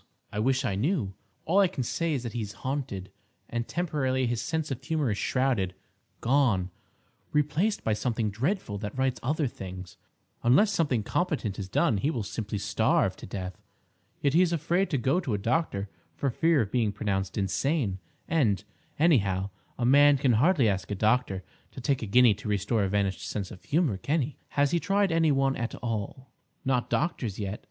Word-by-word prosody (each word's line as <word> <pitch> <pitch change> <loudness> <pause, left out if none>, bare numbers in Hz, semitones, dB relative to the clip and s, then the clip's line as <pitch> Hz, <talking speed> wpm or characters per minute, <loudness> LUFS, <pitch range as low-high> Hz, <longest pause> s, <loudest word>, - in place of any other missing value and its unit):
"I 105 - -2
wish 130 +4 +1
I 115 - 0
knew. 110 - 0 0.3
All 185 +5 +3
I 195 - +6
can 135 - -3
say 165 +7 -1
is 130 - -3
that 120 - -5
he 120 - -2
is 105 -1 -5
haunted, 130 -9 -3 0.4
and 120 0 -3
temporarily 135 -7 0
his 120 -1 -1
sense 160 -2 -2
of 135 0 -4
humour 150 -4 0
is 100 - -2
shrouded—gone—replaced 130 - -1
by 110 - +1
something 110 -1 -1
dreadful 120 - -2
that 105 +5 -6
writes 130 -1 0
other 150 +4 0
things. 95 -6 -7 0.4
Unless 140 - +5
something 145 - +1
competent 130 - -1
is 95 -1 -5
done, 105 - +2
he 135 - 0
will 120 -8 -2
simply 105 +1 -4
starve 100 - +1
to - - -9
death. 95 -2 -6 0.6
Yet 140 -1 +2
he 170 - +6
is 180 -2 +3
afraid 170 +4 +1
to 145 - +1
go 135 +7 +2
to 135 - -1
a - - 0
doctor 105 -2 0 0.3
for 140 - -1
fear 160 +3 +3
of 100 -3 -3
being 115 -4 +1
pronounced 95 -2 -2
insane; 100 - 0 0.3
and, 110 - +2 0.3
anyhow, 100 - +2 0.3
a 120 - 0
man 145 +2 +6
can 130 -1 +2
hardly 135 - +4
ask 95 -2 -1
a 105 - -2
doctor 105 -2 +1 0.3
to - - -8
take 130 +1 0
a 110 - -3
guinea 120 +2 +6
to 105 +1 -7
restore 105 +2 +1
a - - -1
vanished 100 -3 0
sense 100 -3 -4
of 95 - -11
humour, 150 - +1
can 145 - 0
he?" 140 +3 -6 0.2
"Has 145 0 +4
he 170 - +2
tried 195 +1 +1
any 165 -2 +3
one 135 -1 +2
at 115 0 -3
all—?" 115 +3 -4 0.3
"Not 130 -2 +1
doctors 125 - -1
yet. 100 0 -4
125 Hz, 185 wpm, -28 LUFS, 105-150 Hz, 0.6 s, I